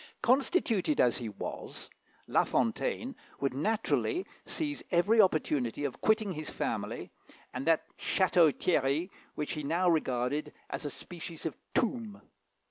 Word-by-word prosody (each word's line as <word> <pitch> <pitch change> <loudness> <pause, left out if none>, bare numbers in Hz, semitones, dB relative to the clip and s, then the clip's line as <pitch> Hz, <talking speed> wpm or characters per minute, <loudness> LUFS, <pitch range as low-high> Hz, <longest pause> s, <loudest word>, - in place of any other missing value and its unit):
Constituted 265 - +2
as 120 0 +4
he 115 -3 -4
was, 100 - -7 0.4
La - - +3
Fontaine 135 - 0 0.2
would 140 -2 0
naturally 220 - 0 0.2
seize 295 -2 -2
every 200 +6 +5
opportunity 145 - +1
of 140 -3 -3
quitting 220 -2 +3
his 155 -3 -5
family - - -3 0.4
and 130 +4 -4
that 165 -1 +4 0.2
Château 175 -4 +4
Thierry 155 +3 +1 0.2
which 150 - -3
he 150 - -3
now 170 +6 +1
regarded 145 -3 +1 0.2
as - - -4
a - - -1
species 165 +3 -8
of 160 - -2 0.2
tomb. 230 -4 0
165 Hz, 130 wpm, -31 LUFS, 140-220 Hz, 0.4 s, every